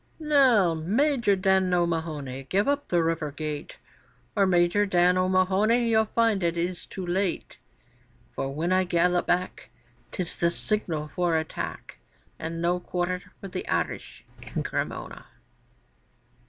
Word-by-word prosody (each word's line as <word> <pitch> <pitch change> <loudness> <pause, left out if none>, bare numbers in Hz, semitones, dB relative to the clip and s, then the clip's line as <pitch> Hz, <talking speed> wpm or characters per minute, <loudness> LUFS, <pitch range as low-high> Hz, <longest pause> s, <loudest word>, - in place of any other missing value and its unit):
'Now, 265 - +4
Major 220 - +1
Dan 190 -1 +2
O'Mahony, 155 -6 -2
give 200 +5 +1
up 285 0 0
the 175 -2 +2
river 165 -2 -1
gate, 150 0 -6 0.6
Or, 200 -2 +3
Major 180 +3 +3
Dan 180 -1 +3
O'Mahony, 190 +6 +2
you'll 220 -1 +4
find 225 -2 +1
it 170 -1 0
is 175 +1 -3
too 190 - -6
late; 185 +1 -2 0.7
For 135 - -3
when 160 +5 -2
I 185 0 +3
gallop 175 0 +1
back 180 +1 -1 0.4
'Tis 180 -2 -3
the 170 - +3
signal 170 -6 -2
for 170 +1 0
attack, 160 - -5 0.4
And 165 +1 -4
no 175 +1 +1
quarter 180 +1 -3
for 195 - -7
the - - -5
Irish - - -3 0.2
in - - -4
Cremona! - - -4
180 Hz, 135 wpm, -26 LUFS, 170-200 Hz, 0.7 s, Now